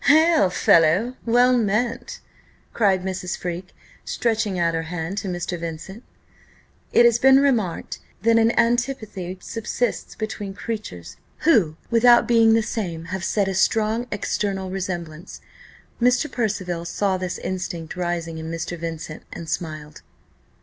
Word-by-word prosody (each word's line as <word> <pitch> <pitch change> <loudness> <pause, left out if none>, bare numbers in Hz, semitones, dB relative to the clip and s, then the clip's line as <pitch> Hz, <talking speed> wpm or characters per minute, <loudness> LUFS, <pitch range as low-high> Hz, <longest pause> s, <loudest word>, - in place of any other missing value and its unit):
"Hail, 315 - +5
fellow! 180 +8 +3
well 245 +2 +5
met!" 240 - -1 0.5
cried 195 -4 +2
Mrs. 185 -1 -3
Freke, 180 +1 -5 0.3
stretching 220 -4 -1
out 170 -1 +1
her 165 - -1
hand 175 +3 -3
to 200 - -6
Mr. 175 -1 -3
Vincent. 170 +6 -7 0.9
It 240 - +6
has 235 -1 +4
been 265 +1 +6
remarked, 235 -11 0 0.2
that 230 0 +5
an 225 +1 +4
antipathy 230 -6 -1
subsists 225 +4 -3
between 210 -3 -5
creatures, 140 - -6 0.2
who, 220 - +3 0.2
without 240 +1 +6
being 225 -2 +5
the 225 - +2
same, 175 -8 -4
have 190 -1 -3
yet 200 -2 +3
a 195 - -1
strong 220 +5 +1
external 195 -2 -2
resemblance. 175 -4 -5 0.6
Mr. 250 +5 +2
Percival 185 -7 -2
saw 190 +2 -1
this 185 -1 -4
instinct 180 -3 -5
rising 170 -2 -3
in 160 0 -6
Mr. 165 +1 -4
Vincent, 165 -2 -6
and 170 -2 -8
smiled. 155 -3 -5
195 Hz, 135 wpm, -23 LUFS, 175-230 Hz, 0.9 s, It